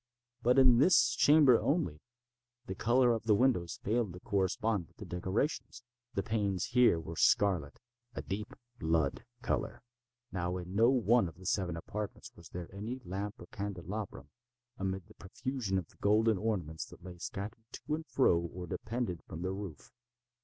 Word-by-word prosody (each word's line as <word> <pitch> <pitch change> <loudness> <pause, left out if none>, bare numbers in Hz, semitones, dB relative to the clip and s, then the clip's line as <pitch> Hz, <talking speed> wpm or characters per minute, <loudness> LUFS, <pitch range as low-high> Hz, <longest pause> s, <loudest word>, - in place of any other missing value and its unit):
But 125 +2 +3
in 130 -3 +7
this 170 +6 +5
chamber 145 -5 +6
only, 90 - 0 0.7
the 95 - -4
color 120 +4 +3
of 110 -1 -3
the 110 -2 +5
windows 100 -8 +1
failed 110 -3 0
to 90 - -9
correspond 100 -1 0
with - - -30
the - - -8
decorations. 105 - -2 0.3
The 100 - 0
panes 100 -5 -1
here 120 -9 +5
were 80 0 -7
scarlet—a 105 - 0
deep 105 +2 -5 0.2
blood 80 -3 0 0.2
color. 115 - -2 0.5
Now 90 -1 -2
in 90 0 -7
no 115 +4 +5
one 120 -4 +3
of 80 - -15
the 95 - -13
seven 90 -5 0
apartments 105 +4 -6
was 85 -2 -14
there 85 -1 -6
any 110 +6 -5
lamp 100 +3 -4
or - - -9
candelabrum, 100 -4 -5 0.5
amid 95 -2 -2
the - - -17
profusion 110 0 -3
of 90 - -2 0.2
golden 110 0 +3
ornaments 90 -8 -2
that - - -15
lay 90 -2 -9
scattered 105 +4 -6
to 150 - -5
and 160 +1 -3
fro 105 -10 +3
or 85 +1 -6
depended 110 -1 -3
from 80 +2 -6
the 95 - -1
roof. 95 -6 -7
100 Hz, 160 wpm, -32 LUFS, 90-115 Hz, 0.7 s, in